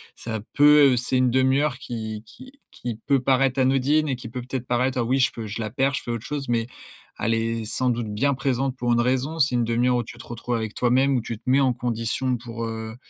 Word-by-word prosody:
ça 110 Hz, -1 st, -5 dB
peut 145 Hz, -2 st, +6 dB
c'est 125 Hz, +2 st, 0 dB
1/2 130 Hz, +2 st, +2 dB
qui 110 Hz, -4 st, -6 dB
qui 260 Hz, -, -14 dB, 0.2 s
qui 120 Hz, -3 st, -5 dB
peut 140 Hz, -1 st, +3 dB
paraître 135 Hz, 0 st, +2 dB
anodine 135 Hz, +4 st, +2 dB
et 130 Hz, -, 0 dB
qui 125 Hz, -2 st, -9 dB
peut 125 Hz, +2 st, -5 dB
peut-être 125 Hz, 0 st, -5 dB
paraître: 125 Hz, +2 st, 0 dB
«Ah -, -, +2 dB
oui, 130 Hz, +4 st, +1 dB
je 130 Hz, -, +3 dB
peux 115 Hz, -2 st, -7 dB
je 105 Hz, +3 st, -5 dB
la 110 Hz, -, -3 dB
perds, 135 Hz, +4 st, 0 dB
je -, -, -3 dB
fais -, -, -8 dB
autre 115 Hz, -2 st, -4 dB
chose», 145 Hz, -3 st, -4 dB
mais 115 Hz, -1 st, +1 dB, 0.5 s
elle 115 Hz, -, +1 dB
est 115 Hz, 0 st, -2 dB
sans 125 Hz, +4 st, 0 dB
doute 120 Hz, -1 st, -2 dB
bien 140 Hz, +7 st, +1 dB
présente 135 Hz, 0 st, -1 dB
pour 120 Hz, -1 st, 0 dB
une 120 Hz, -, +3 dB
raison. 130 Hz, +6 st, 0 dB
C'est 140 Hz, -3 st, +3 dB
1/2 120 Hz, +1 st, +2 dB
où 120 Hz, -, -1 dB
tu 120 Hz, -, -11 dB
te -, -, -10 dB
retrouves 120 Hz, +1 st, -5 dB
avec 110 Hz, -2 st, -3 dB
toi-même, 130 Hz, +3 st, +2 dB
où 125 Hz, -, +1 dB
tu 115 Hz, -1 st, -5 dB
te -, -, -30 dB
mets 135 Hz, +2 st, +5 dB
en 130 Hz, -2 st, +3 dB
condition 120 Hz, +1 st, -1 dB
pour, 115 Hz, 0 st, -6 dB
heu, 110 Hz, 0 st, -5 dB
125 Hz, 240 wpm, -24 LUFS, 115-135 Hz, 0.5 s, peut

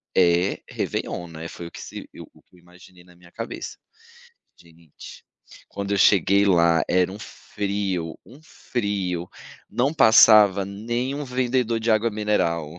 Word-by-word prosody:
é 90 Hz, +1 st, +2 dB
Réveillon, 85 Hz, -, -4 dB
né?", 80 Hz, 0 st, -8 dB
foi 85 Hz, 0 st, -9 dB
o -, -, -13 dB
que -, -, -10 dB
se -, -, -9 dB
eu -, -, -11 dB
o -, -, -22 dB
que -, -, -27 dB
eu -, -, -20 dB
imaginei 90 Hz, +1 st, -19 dB
na 90 Hz, 0 st, -21 dB
minha 85 Hz, 0 st, -20 dB
cabeça. 115 Hz, 0 st, -7 dB, 0.8 s
Gente, 85 Hz, -2 st, -15 dB, 0.4 s
quando 100 Hz, 0 st, -5 dB
eu 100 Hz, -, +1 dB
cheguei 100 Hz, +1 st, +4 dB
lá 85 Hz, -3 st, +3 dB
era 90 Hz, 0 st, +2 dB
um 100 Hz, -, -9 dB
frio 100 Hz, -6 st, -4 dB
um 130 Hz, +5 st, -16 dB
frio, 100 Hz, -, -4 dB, 0.4 s
não 130 Hz, +4 st, 0 dB
passava 105 Hz, -, +6 dB
nem 120 Hz, +7 st, -4 dB
um 145 Hz, +1 st, -5 dB
vendedor 125 Hz, -2 st, -1 dB
de 115 Hz, +1 st, -1 dB
água 110 Hz, +1 st, +2 dB
mineral. 85 Hz, -7 st, -1 dB
100 Hz, 155 wpm, -23 LUFS, 85-110 Hz, 0.8 s, passava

